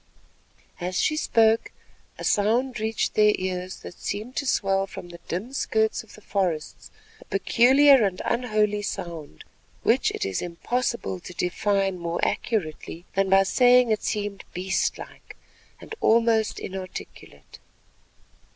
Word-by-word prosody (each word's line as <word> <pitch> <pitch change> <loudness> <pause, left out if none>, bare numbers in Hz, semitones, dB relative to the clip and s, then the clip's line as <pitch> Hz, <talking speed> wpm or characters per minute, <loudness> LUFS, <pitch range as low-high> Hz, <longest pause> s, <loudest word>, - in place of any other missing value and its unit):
As 180 +1 -2
she 310 - +2
spoke, 225 -6 +2 0.5
a - - -8
sound 235 +4 +1
reached 220 0 -1
their 210 0 +5
ears 185 0 -4
that - - -9
seemed 215 +6 -5
to 280 - -1
swell 195 -4 +1
from 175 - -9
the 170 0 -11
dim 210 +10 -4
skirts 220 -5 0
of 225 - -16
the 215 - -15
forests, 180 -7 -3 0.3
a - - -15
peculiar 270 +2 +5
and 190 -3 -1
unholy 215 -4 +1
sound 165 - -6 0.4
which - - +3
it - - -3
is 95 -1 -2
impossible 210 +4 -2
to 180 0 -11
define 195 +1 0
more 170 0 -3
accurately 170 -4 -3
than 195 0 +1
by 195 0 +6
saying 245 +4 +5
that 215 -1 +2
it - - -19
seemed 205 -2 -3
beastlike, 185 +1 -3 0.4
and - - -10
almost 225 -1 +3
inarticulate. 185 -1 -9
205 Hz, 135 wpm, -25 LUFS, 185-230 Hz, 0.5 s, by